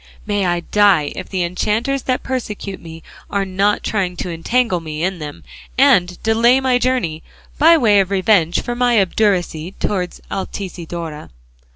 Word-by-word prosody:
May 205 -3 0
I 175 0 0
die 190 -6 +3
if - - -7
the 185 -2 -1
enchanters 215 +10 -1
that 255 - 0
persecute 210 -6 -5
me 165 -1 -11 0.3
are 200 -1 -1
not 195 +2 0
trying 185 -4 -1
to 180 - -4
entangle 185 +4 0
me 155 -1 -5
in 185 -1 -1
them 150 -2 -8 0.3
and 190 -10 +4
delay 230 +3 +4
my 260 -2 +2
journey, 245 -12 -1 0.4
by 330 +3 +7
way 215 -8 +4
of 190 -1 +1
revenge 190 -3 +2
for 240 - -3
my 240 -2 +2
obduracy 185 -4 0
towards 185 -3 -2
Altisidora. 170 -5 -6
195 Hz, 155 wpm, -18 LUFS, 175-230 Hz, 0.4 s, by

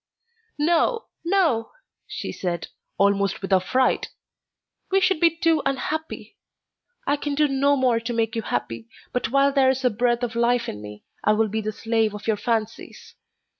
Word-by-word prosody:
"No, 345 +10 +2 0.2
no!" 335 - +1 0.3
she - - -5
said, 175 -3 -4 0.3
almost 200 -1 +1
with 195 - -1
affright; 255 +8 +2 0.8
"we 385 0 +3
should 380 -3 +2
be 335 - +6
too 330 -2 +2
unhappy. 305 +4 -3 0.7
I 285 - +2
can 290 0 -3
do 300 +1 +3
no 280 +1 +2
more 255 -4 +2
to 230 +1 -4
make 225 -1 -1
you 225 - -1
happy, 115 - -4 0.3
but 250 - -1
while 275 +2 +3
there 270 -2 +4
is 265 0 0
a 250 - +4
breath 240 +2 0
of 235 -2 -2
life 235 0 +2
in 105 - -6
me, 105 0 -10 0.2
I 210 - +4
will 220 0 +1
be 220 +2 -2
the 215 0 -3
slave 225 -1 0
of 210 - -9
your 220 -2 +1
fancies. 220 0 -3
240 Hz, 170 wpm, -24 LUFS, 215-280 Hz, 0.8 s, be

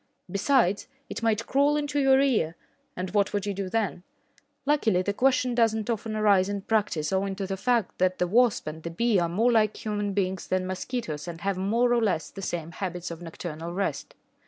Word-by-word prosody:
Besides, 200 -2 +2 0.2
it - - -4
might 225 -1 +1
crawl 285 +2 +3
into 290 -1 -1
your 270 -1 +5
ear, 220 - +2 0.4
and 185 0 -4
what 205 -1 +1
would 205 -1 -1
you 205 - -1
do 195 -1 -4
then? 210 -4 -1 0.6
Luckily, 225 -11 +2
the 200 - -1
question 255 +1 +2
does 230 -2 +3
not 220 +1 -2
often 220 -1 -3
arise 200 -3 +3
in 200 -1 -3
practice 200 -7 0
owing 195 0 0
to 195 0 -3
the 195 0 -3
fact 235 0 0
that 185 0 +2
the 180 - +1
wasp 235 +5 +3
and 155 +1 -6
the 170 - -5
bee 215 +4 +2
are 170 -1 0
more 225 +8 +2
like 215 -2 +1
human 205 -1 -1
beings 190 -1 -1
than 185 0 0
mosquitoes 185 - -4
and 170 -1 -7
have 195 +1 0
more 230 +6 +2
or 240 - +2
less 185 -7 0
the 195 - -8
same 170 -3 -4
habits 180 -2 -5
of 170 0 -8
nocturnal 165 0 -6
rest. 195 +2 -3
200 Hz, 205 wpm, -27 LUFS, 180-230 Hz, 0.6 s, your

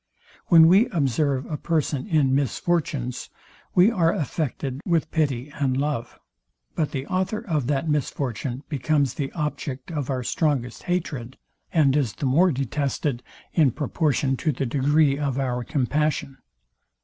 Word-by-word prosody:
When 165 -2 +8
we 195 +7 +6
observe 140 - 0
a 150 - -4
person 155 -3 -1
in 150 -8 +2
misfortunes, 140 -1 -1 0.5
we 185 +5 +6
are 170 -7 +2
affected 145 -2 -3
with 165 -3 0
pity 145 -4 -1
and 130 -2 +1
love; 140 -4 -2 0.6
but 155 - 0
the 135 -1 -4
author 190 +5 -1
of 150 -8 -1
that 145 +2 0
misfortune 135 -3 -2
becomes 145 -1 +1
the 135 -2 -3
object 150 -2 -4
of 145 -5 -3
our 130 -2 -1
strongest 130 -4 -1
hatred, 145 -9 -3 0.3
and 145 -5 +3
is 135 -8 +1
the - - -4
more 165 +8 +4
detested 135 -1 -2 0.3
in 155 -5 +4
proportion 145 0 0
to 155 - 0
the 135 0 -2
degree 140 +3 +2
of 140 -3 -1
our 125 -2 -1
compassion. 140 +1 -1
145 Hz, 140 wpm, -24 LUFS, 130-155 Hz, 0.6 s, When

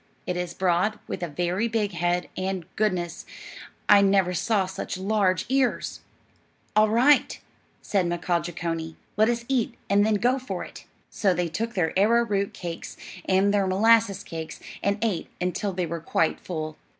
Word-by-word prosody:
It 180 - -2
is 180 -1 -3
broad, 185 +4 +1
with - - -5
a 175 - -1
very 180 +7 -1
big 220 -3 0
head, 175 0 0
and, 185 -2 -3
goodness, 185 -5 -1 0.6
I 205 -1 +7
never 195 -2 +3
saw 195 +3 +1
such 190 0 -5
large 190 -1 +1
ears!" 265 -1 0 0.8
"All 215 0 +5
right," 250 +7 +4 0.4
said 190 -4 +1
Mkaaah 175 0 0
Jeechonee; 165 -1 -4 0.2
"let 215 +2 +4
us 235 0 -1
eat, 260 -4 0 0.2
and 200 +1 +5
then 215 0 +2
go 245 +6 +2
for 260 - -5
it." - - -11 0.3
So 190 -3 +1
they 175 0 -1
took 225 +7 -3
their 170 -4 +1
arrowroot 205 -1 +2
cakes, 170 -2 -7 0.3
and 195 +2 +3
their 200 -2 +2
molasses 220 +1 +3
cakes, 160 -1 -7 0.2
and 200 +1 +1
ate 205 -7 -1
until 180 +3 -1
they 180 -1 -2
were 165 0 -5
quite 165 0 0
full. 155 -3 -5
190 Hz, 160 wpm, -25 LUFS, 175-215 Hz, 0.8 s, I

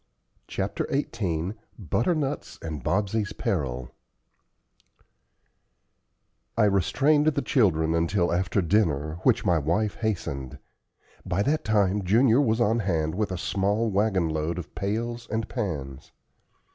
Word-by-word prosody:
CHAPTER - - -2
XVIII 95 - -1 0.2
BUTTERNUTS 135 - -1
AND 80 -3 -5
BOBSEY'S 105 +5 0
PERIL 65 - -2 2.7
I 115 - +4
restrained 135 - +3
the 145 -2 +2
children 80 - +2
until 85 +2 +1
after 90 +2 +1
dinner, 80 -5 +1
which - - +2
my 85 -3 +3
wife 90 +8 0
hastened. 75 - -3 0.7
By 95 +2 0
that 150 +5 0
time 105 -2 +2
Junior 115 +7 +4
was 115 -4 +1
on 115 0 +2
hand 80 -6 0
with 105 0 -1
a 95 - -2
small 100 +5 0
wagon 95 -3 +2
load 80 +2 -2
of 90 - -7
pails 115 +4 -3
and 110 0 -2
pans. 75 - -5
100 Hz, 120 wpm, -26 LUFS, 80-110 Hz, 2.7 s, I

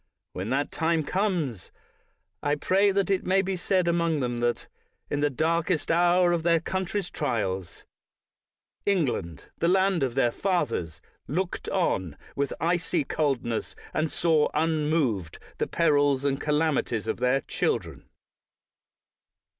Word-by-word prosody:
When 95 +4 -4
that 135 +3 0
time 165 -1 +1
comes, 165 - -1 0.7
I 145 0 +1
pray 195 +6 +3
that 200 -1 +1
it 190 - +1
may 190 +1 +3
not - - -6
be 190 0 -1
said 185 0 +1
among 170 -2 +1
them, 120 -2 -2
that 120 0 0 0.5
in 145 - 0
the 145 0 +2
darkest 165 +4 0
hour 175 +1 +4
of 170 -1 +1
their 170 0 +3
country's 185 +2 -3
trials, 100 - -3 1.0
England, 130 - -1
the 170 - +2
land 190 0 +3
of 130 -3 -1
their 120 -3 +3
fathers, 115 - -1 0.3
looked 180 +5 -2
on 95 - 0 0.2
with 140 0 -1
icy 170 0 +1
coldness 135 -6 -1 0.2
and 155 0 0
saw 160 -3 +2
unmoved 150 - 0 0.2
the - - 0
perils 145 -4 +2
and 135 -1 0
calamities 150 -7 0
of - - -1
their 125 +2 +2
children. - - -2
155 Hz, 135 wpm, -27 LUFS, 130-175 Hz, 1.0 s, hour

